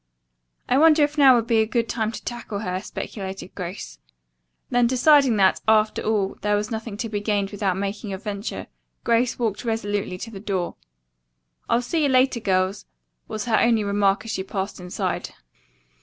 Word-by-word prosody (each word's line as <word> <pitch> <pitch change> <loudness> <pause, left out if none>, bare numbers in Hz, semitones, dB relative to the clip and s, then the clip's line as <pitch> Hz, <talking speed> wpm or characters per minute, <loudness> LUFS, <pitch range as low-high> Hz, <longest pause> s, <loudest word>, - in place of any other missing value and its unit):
"I 255 - +3
wonder 310 -1 +6
if 290 +1 0
now 275 -4 +7
would 230 -2 +1
be 230 -2 +2
a 220 - 0
good 230 0 0
time 220 -2 -1
to - - -9
tackle 240 -4 -5
her," 185 -2 -3
speculated 195 -2 -7
Grace. 180 - -7 0.7
Then 245 -1 +4
deciding 265 0 +5
that, 190 -1 +3
after 215 0 +3
all, 205 -3 -1
there 210 0 +1
was 210 +2 -2
nothing 220 -2 -5
to 230 - -3
be 210 -2 -3
gained 205 -1 -1
without 195 -3 -1
making 200 +1 -4
a 190 - -3
venture, 200 +2 -5 0.4
Grace 235 +1 +2
walked 225 -3 -2
resolutely 205 -5 -2
to 225 +5 -7
the 200 - -8
door. 190 -4 -2 1.0
"I'll 235 +1 +2
see 320 +6 -1
you 290 - +2
later, 255 -1 +3
girls," 190 -1 0 0.4
was 215 +1 -4
her 230 -2 +2
only 230 -2 +3
remark 200 0 +1
as 225 - -4
she 190 - -2
passed 190 +1 -4
inside. 180 0 -4
215 Hz, 180 wpm, -23 LUFS, 200-235 Hz, 1.0 s, now